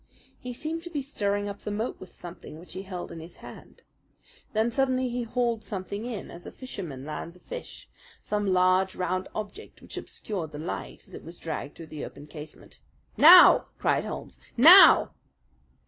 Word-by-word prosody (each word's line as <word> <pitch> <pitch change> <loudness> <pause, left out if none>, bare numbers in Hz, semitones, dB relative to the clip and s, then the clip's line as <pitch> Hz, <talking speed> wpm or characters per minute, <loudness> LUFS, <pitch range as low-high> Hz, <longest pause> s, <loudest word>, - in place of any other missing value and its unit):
He 250 - -7
seemed 315 +6 -4
to 345 - -9
be 295 -5 -3
stirring 205 -7 -2
up 200 0 -6
the - - -6
moat 215 +4 -3
with 185 - -13
something 170 -3 -10
which 175 +3 -11
he 185 - -5
held 185 -2 -7
in 165 - -8
his 165 +2 -11
hand. - - -13 0.7
Then 220 +2 +1
suddenly 260 0 +1
he 245 +1 -3
hauled 235 -1 -1
something 200 +2 -5
in 230 -5 -6
as 175 - -11
a - - -8
fisherman 170 - -8
lands 160 +3 -6
a - - -17
fish - - -9 0.4
some 205 -1 -2
large, 185 0 +3
round 185 +1 -2
object 215 - -7
which - - -11
obscured 175 -8 -5
the - - -6
light 160 +4 -6
as 190 - -15
it - - -9
was 170 +2 -10
dragged 155 -3 -6
through 165 - -10
the 150 - -6
open 140 - -9
casement. 150 0 -12 0.4
"Now!" 355 +4 +9
cried - - +1
Holmes. - - -7 0.2
"Now!" 345 +10 +9
200 Hz, 180 wpm, -27 LUFS, 175-245 Hz, 0.7 s, Now